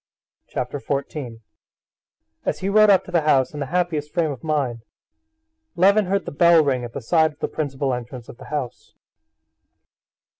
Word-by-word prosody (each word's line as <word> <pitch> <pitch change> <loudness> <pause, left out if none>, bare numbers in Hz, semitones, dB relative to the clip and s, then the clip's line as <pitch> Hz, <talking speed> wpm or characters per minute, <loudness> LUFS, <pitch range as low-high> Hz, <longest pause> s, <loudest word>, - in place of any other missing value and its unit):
Chapter 130 +3 -4
14 135 -4 -4 1.0
As - - -1
he 190 - -1
rode 215 +1 +5
up 190 -2 +5
to - - -11
the 170 -2 +2
house 135 -4 +2
in 150 - -6
the 140 - -3
happiest 160 -3 -1
frame 165 -3 0
of 130 - -8
mind, 140 -7 -1 0.9
Levin 200 +4 +4
heard 195 +1 0
the - - -5
bell 170 +2 +5
ring 130 -4 0
at 120 -1 -7
the - - -5
side 160 +4 +2
of 150 - -32
the - - -1
principal 140 -3 -2
entrance 125 0 -7
of - - -12
the - - -12
house. 145 -5 -6
150 Hz, 175 wpm, -22 LUFS, 130-170 Hz, 1.0 s, rode